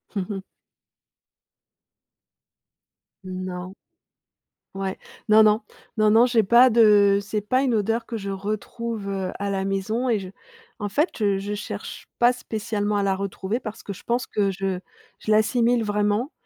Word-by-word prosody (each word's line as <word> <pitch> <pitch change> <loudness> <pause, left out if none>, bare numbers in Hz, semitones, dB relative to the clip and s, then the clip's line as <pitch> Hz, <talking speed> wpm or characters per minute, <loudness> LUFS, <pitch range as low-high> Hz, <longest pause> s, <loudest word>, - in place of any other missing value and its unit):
Mmh 195 -2 -1
mh. 195 -2 -4 2.8
Non. 185 0 -6 1.0
Ouais, 195 -1 -3 0.3
non 215 +1 +7
non, 215 +1 +4 0.4
non, 215 0 +4
non 225 +3 +6
j'ai 240 -3 +3
pas 240 +4 +6
de, 205 -3 +5
c'est 210 +1 -3
pas 255 +6 +1
une 255 -4 +1
odeur 225 +2 0
que 230 - -4
je 200 -1 -5
retrouve, 215 +2 -4
heu, 190 -2 -2
à 200 0 -2
la 195 -1 -1
maison 215 +6 -1
et 225 - +3
je 190 -2 -6 0.5
en 205 - -3
fait, 300 - +1
je 200 -2 +2
je 200 +1 -4
cherche 210 - -7
pas 240 +1 +5
spécialement 210 -3 -2
à 200 - +1
la 195 -1 +1
retrouver 195 +3 -3
parce 215 -3 -8
que 200 - -5
je - - -13
pense 240 +1 -1
que 200 -2 0
je 190 -1 -2 0.4
je 215 - -2
l'assimile 230 +2 +3
vraiment 210 +6 0
210 Hz, 155 wpm, -24 LUFS, 195-230 Hz, 2.8 s, non